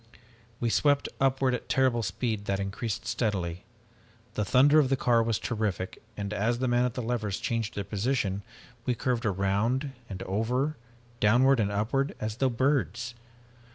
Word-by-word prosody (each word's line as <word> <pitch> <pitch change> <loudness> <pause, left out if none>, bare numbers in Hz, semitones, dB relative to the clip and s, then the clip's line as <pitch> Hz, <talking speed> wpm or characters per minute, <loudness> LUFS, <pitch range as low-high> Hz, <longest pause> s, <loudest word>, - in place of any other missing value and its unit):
"We 120 -1 0
swept 145 +2 +3
upward 135 -1 +2
at 125 - -4
terrible 130 -3 +3
speed 110 -2 -2
that 100 -1 0
increased 100 +3 -3
steadily. 90 -6 -2 0.7
The 105 - 0
thunder 140 +8 +5
of 140 -4 +3
the 135 - +3
car 120 -2 +3
was 115 -1 +1
terrific, 105 -5 -3 0.2
and, 100 0 -3
as 110 +3 +1
the 130 +1 0
man 120 0 +3
at 125 - -2
the 125 - -3
levers 110 -4 -2
changed 115 -2 -2
their 100 - -2
position, 100 -1 -1 0.4
we 125 0 0
curved 120 0 0
around 105 +8 0 0.2
and 95 -2 -5
over 125 +10 0 0.4
downward 125 +5 +5
and 100 -2 +1
upward 120 +7 0
as 110 0 -3
though 135 -1 +2
birds. 120 - 0
115 Hz, 160 wpm, -28 LUFS, 100-130 Hz, 0.7 s, thunder